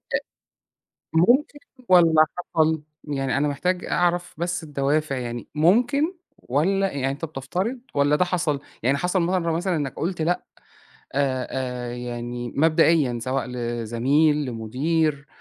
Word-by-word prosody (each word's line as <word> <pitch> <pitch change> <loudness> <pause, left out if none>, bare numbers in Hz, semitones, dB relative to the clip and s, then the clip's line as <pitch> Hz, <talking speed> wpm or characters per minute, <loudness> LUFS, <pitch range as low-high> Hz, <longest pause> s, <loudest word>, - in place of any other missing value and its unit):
أ - - +2 0.9
ممكن 245 - +3 0.3
والّا 165 -3 +6 0.3
حصل؟ 160 -1 +3 0.2
يعني 135 -3 -1
أنا 150 - +2
محتاج 180 +6 -1
أعرف 175 0 0
بس 175 +1 -2
الدوافع، 145 -1 0
يعني 120 -1 -5
ممكن 245 - +3 0.2
والّا 190 +8 0
يعني 135 -1 -1
أنت 140 +4 -4
بتفترض 175 - -3
والّا 145 +1 +3
ده 180 - +2
حصل؟ 170 -6 0 0.2
يعني 135 +3 +2
حصل 180 +3 0
مَرّة 170 -1 0
مثلًا 175 +2 0
إنّك 145 -4 -2
قُلت 170 +1 -2
لأ 175 +3 0 0.7
آآ، 130 -2 0
آآ 125 -2 -3
يعني 120 0 -5
مبدئيًا 155 -5 +3
سواء 130 +2 -1
لزميل، 125 +5 +1
لمدير، 140 +6 -1
150 Hz, 130 wpm, -24 LUFS, 130-175 Hz, 0.9 s, والّا